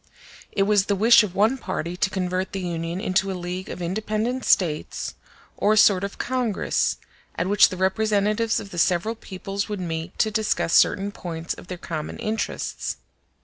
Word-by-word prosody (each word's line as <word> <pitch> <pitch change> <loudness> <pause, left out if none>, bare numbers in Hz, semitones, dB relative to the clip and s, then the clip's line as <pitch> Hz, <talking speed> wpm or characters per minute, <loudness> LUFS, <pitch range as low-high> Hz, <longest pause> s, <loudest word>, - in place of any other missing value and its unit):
It 195 - +2
was 205 -1 +3
the 200 - +2
wish 225 +5 +7
of 195 -4 -4
one 225 +6 +3
party 180 -4 -3
to 190 - +1
convert 185 0 -2
the 195 - -2
Union 170 0 -3
into 195 -1 +1
a 185 - -4
league 180 +1 -5
of 180 - -5
independent 215 +7 -2
States, 155 -5 +1 0.4
or 210 - +3
a - - +1
sort 200 -2 +5
of 200 - -4
congress, 245 -5 0 0.4
at 170 - -1
which 205 +2 +5
the 185 - -6
representatives 210 +3 +1
of 195 - -9
the 175 - -4
several 180 +6 +2
peoples 200 -1 -5
would 210 -2 -3
meet 165 0 -4
to 215 - +2
discuss 215 -5 0
certain 200 0 +4
points 165 -3 -5
of - - -12
their 180 - -5
common 160 -3 -5
interests. 220 +1 -3
195 Hz, 180 wpm, -24 LUFS, 180-215 Hz, 0.4 s, wish